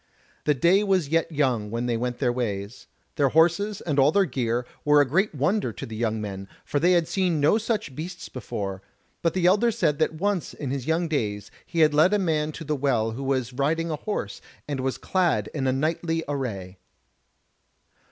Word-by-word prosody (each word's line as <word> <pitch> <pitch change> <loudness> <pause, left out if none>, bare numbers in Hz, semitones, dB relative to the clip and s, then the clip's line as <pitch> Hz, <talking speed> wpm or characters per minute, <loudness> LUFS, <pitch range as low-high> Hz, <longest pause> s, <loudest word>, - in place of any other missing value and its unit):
The 150 - +3
day 180 +9 +4
was 190 -7 +1
yet 165 +1 +1
young 130 -8 0
when 115 +2 -2
they 120 -1 0
went 120 +1 -2
their 125 -3 +1
ways. 105 -3 -4 0.3
Their 140 -2 +3
horses 175 +7 +2
and 145 -4 -1
all 135 +2 +5
their 200 +2 +3
gear 125 -4 -1 0.2
were 150 0 +5
a 145 - +5
great 185 +6 +1
wonder 150 - +1
to - - -7
the 110 - -8
young 110 -1 -1
men, 100 -2 -6 0.2
for 145 - 0
they 175 +4 +4
had 170 -2 +2
seen 180 -5 0
no 155 +10 +4
such 215 - -2
beasts 175 +4 -6
before: 100 -6 -5 0.4
but 165 - 0
the 185 -2 +1
elder 200 +6 +4
said 165 -10 0
that 160 0 +1
once 195 +1 -1
in 140 -4 -4
his 135 -1 -4
young 165 +2 +1
days 105 - -2 0.2
he 165 - 0
had 155 -1 +5
led 160 +7 +5
a - - +3
man 155 -5 0
to 165 - -7
the 150 0 -1
Well 125 -5 +1
who 120 +5 -6
was 130 -2 -1
riding 160 +5 0
a - - 0
horse 150 - -4 0.3
and 145 -2 -3
was 130 0 -1
clad 170 - 0
in 140 -3 -2
knightly 165 +2 -1
array. 100 -10 -4
150 Hz, 200 wpm, -25 LUFS, 125-170 Hz, 0.4 s, all